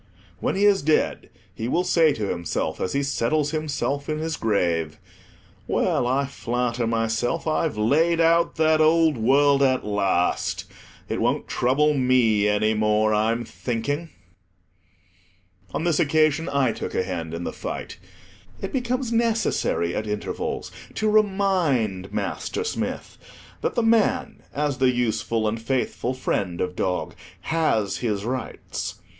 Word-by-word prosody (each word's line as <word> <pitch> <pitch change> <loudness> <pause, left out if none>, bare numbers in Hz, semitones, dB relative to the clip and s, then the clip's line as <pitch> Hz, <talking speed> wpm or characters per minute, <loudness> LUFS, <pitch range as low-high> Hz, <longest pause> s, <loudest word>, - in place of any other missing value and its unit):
When - - -1
he 200 +2 +2
is 200 -1 +4
dead, 155 +1 +1 0.2
he 110 - -4
will 170 +8 +1
say 165 -3 +4
to 110 -7 -2
himself, 85 -2 -3
as 95 - -1
he 140 - +1
settles 140 +2 0
himself 145 -2 -2
in 155 - -1
his 160 +1 -2
grave—"Well, 85 - -2
I 135 +3 +1
flatter 125 -3 -2
myself 115 +6 -1
I've 155 -5 0
laid 160 +10 +2
out 165 +1 +3
that 155 0 +3
old 160 -1 +4
world 140 +4 +3
at 130 -2 +2
last. 100 -4 0 0.4
It - - -2
won't - - 0
trouble 145 +5 +2
me 125 -6 +3
any 105 +1 +2
more, 110 0 +2
I'm 115 +3 +1
thinking." 145 +9 -3 1.6
On - - -2
this 170 -3 +1
occasion, 155 +2 +2
I 140 -4 +2
took - - -5
a - - +1
hand 85 -3 -4
in 85 - -5
the - - -4
fight. - - -6 0.6
It 195 - -5
becomes 250 -1 -1
necessary 225 - +1
at 110 - -3
intervals 105 0 -3 0.2
to 215 -1 +1
remind 180 - +1
Master 430 - -3
Smith 450 - -4 0.4
that - - -1
the 235 - +1
man, 225 -1 +2
as 145 -2 -2
the 130 -1 +4
useful 115 -2 0
and 110 +1 -2
faithful 125 +1 -1
friend 95 -8 -2
of 90 0 -2
dog, 90 0 -2 0.3
has 115 -12 0
his 105 -4 -2
rights. 130 +2 -4
130 Hz, 140 wpm, -24 LUFS, 110-160 Hz, 1.6 s, is